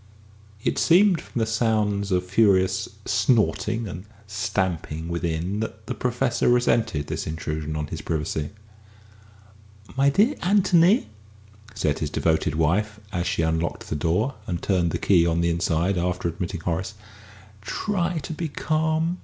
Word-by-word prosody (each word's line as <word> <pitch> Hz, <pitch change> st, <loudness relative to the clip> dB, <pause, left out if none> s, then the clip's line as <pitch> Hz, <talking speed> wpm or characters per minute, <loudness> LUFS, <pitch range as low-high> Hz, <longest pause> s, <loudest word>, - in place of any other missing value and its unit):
It -, -, 0 dB
seemed 180 Hz, +1 st, +5 dB
from -, -, -9 dB
the 115 Hz, -, +2 dB
sounds 110 Hz, -3 st, 0 dB
of 90 Hz, 0 st, +1 dB
furious 95 Hz, -1 st, +2 dB, 0.2 s
snorting 110 Hz, +1 st, +1 dB
and 90 Hz, +1 st, -7 dB, 0.2 s
stamping 90 Hz, -5 st, -2 dB
within, 85 Hz, +3 st, -2 dB
that 110 Hz, -1 st, -5 dB
the 125 Hz, -, -3 dB
Professor 125 Hz, 0 st, 0 dB
resented 115 Hz, -10 st, +2 dB
this -, -, -4 dB
intrusion 80 Hz, -1 st, -4 dB
on 75 Hz, 0 st, -2 dB
his -, -, -6 dB
privacy. 75 Hz, -1 st, -2 dB, 1.5 s
"My 135 Hz, +1 st, +4 dB
dear 210 Hz, -, +3 dB
Anthony," 185 Hz, +2 st, +4 dB, 0.7 s
said 75 Hz, -2 st, 0 dB
his 75 Hz, -, -2 dB
devoted 80 Hz, -1 st, 0 dB
wife, 105 Hz, +7 st, +1 dB
as 90 Hz, -3 st, -2 dB
she 90 Hz, -2 st, 0 dB
unlocked 80 Hz, +1 st, -2 dB
the -, -, 0 dB
door 90 Hz, -, 0 dB
and 85 Hz, -2 st, -2 dB
turned 90 Hz, -4 st, +1 dB
the -, -, -1 dB
key 85 Hz, -4 st, +3 dB
on 85 Hz, 0 st, +1 dB
the 85 Hz, 0 st, +2 dB
inside 85 Hz, +2 st, 0 dB
after 90 Hz, 0 st, -1 dB
admitting 85 Hz, +1 st, -4 dB
Horace, 90 Hz, +5 st, -3 dB, 0.7 s
"try 175 Hz, -, -1 dB
to -, -, -5 dB
be 165 Hz, +1 st, -3 dB
calm. 160 Hz, +3 st, 0 dB
95 Hz, 145 wpm, -24 LUFS, 85-120 Hz, 1.5 s, seemed